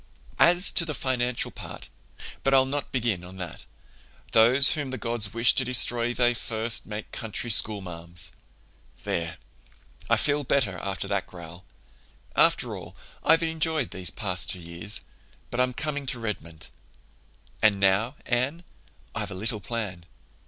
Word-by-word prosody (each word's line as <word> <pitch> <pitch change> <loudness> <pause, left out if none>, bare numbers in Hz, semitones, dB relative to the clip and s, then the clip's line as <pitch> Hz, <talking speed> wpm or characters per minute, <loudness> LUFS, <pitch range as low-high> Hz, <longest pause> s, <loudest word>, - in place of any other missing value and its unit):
"As 175 +2 +5
to 170 - +4
the 155 -3 -4
financial 125 -2 -1
part—but 135 - -7
I'll 130 0 +5
not 140 +1 -4
begin 115 -8 -1
on 90 +1 -11
that. 90 -4 -8 0.7
Those 125 +5 +6
whom 145 -3 -3
the 130 - -5
gods 115 -4 -3
wish 115 +1 +5
to 135 - +3
destroy 120 -1 +4
they 120 0 +2
first 115 -1 -1
make 105 0 -7
country 115 +1 -3
schoolmarms! 90 -4 +3 0.7
"There, 85 -1 -3 0.7
I - - +4
feel 145 0 +1
better, 115 -10 0
after 95 0 -4
that 100 -1 -1
growl. 85 0 -11 0.7
After - - +2
all, - - -10 0.3
I've 165 +1 +4
enjoyed 160 -4 -1
these 90 -2 -3
past 90 -3 -2
two 90 - 0
years. 85 +5 -3 0.5
But 120 - -3
I'm 125 0 +2
coming 145 -1 -3
to 125 -1 +1
Redmond. 85 -8 -6 0.9
"And 105 -2 +4
now, 100 +7 +2
Anne, 130 +8 -1 0.5
I've - - -4
a - - -7
little 110 +3 -2
plan. 100 -4 -5
115 Hz, 145 wpm, -26 LUFS, 95-130 Hz, 0.9 s, Those